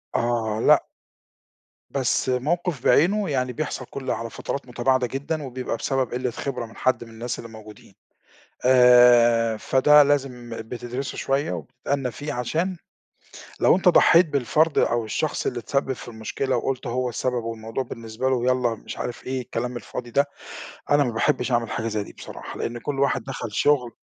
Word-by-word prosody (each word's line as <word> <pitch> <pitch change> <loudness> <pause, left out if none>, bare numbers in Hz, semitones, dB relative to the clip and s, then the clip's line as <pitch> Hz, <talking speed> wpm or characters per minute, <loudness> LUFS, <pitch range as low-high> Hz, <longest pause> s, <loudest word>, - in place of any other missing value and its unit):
آه، 115 -2 0
لأ. - - +5 1.1
بس 130 -1 0
موقِف 150 +3 -1
بعينه 195 +4 +3
يعني 130 -3 -1
بيحصَل 135 -1 -4
كلّ 135 +1 -5
على 115 0 -3
فترات 140 +3 -5
متباعدة 125 +1 +1
جدًا 145 +5 -3
وبيبقى 130 -3 -4
بسبب 135 0 -1
قلّة 125 0 -1
خِبرة 125 0 -4
من 115 - -15
حد 130 -2 0
من 115 - -13
الناس 115 +2 -5
اللي 115 - -9
موجودين. 105 -3 -13 0.7
آآ، 120 -2 +6
فده 145 +6 +5
لازم 135 -4 -1 0.2
بتدرِسه 125 +2 -5
شوية 135 -4 -1
وبتتأنّى 125 - -3
فيه 145 +7 -6
عشان 165 +10 -1 0.8
لو - - +5
أنت 185 - +3
ضحّيت 170 0 +6
بالفَرد 145 +3 +1
أو 120 -1 +2
الشخص 110 - -2
اللي - - -1
اتسبّب 140 -1 -1
في 125 - -9
المشكلة 120 +3 -2
وقُلت 130 +2 -2
هو 125 +1 -1
السبب 125 0 -2
والموضوع 115 +2 -4
بالنسبة 115 +1 -4
له 125 -2 0
يالَّا 125 -2 +2
مش 110 - -9
عارف 120 - -5
إيه 130 0 -2
الكلام 125 0 -4
الفاضي 120 0 -7
ده، 140 +5 +2 0.6
أنا 145 0 +5
ما 125 - -1
باحبش 125 +3 0
أعمل 120 -1 +1
حاجة 115 - -3
زي 105 -2 -2
دي - - -13
بصراحة - - -9
لأن 120 0 -3
كلّ 140 +3 -4
واحد 135 -3 +1
دخَل 125 -4 -6
شُغل 125 0 +2
125 Hz, 165 wpm, -24 LUFS, 115-135 Hz, 1.1 s, آآ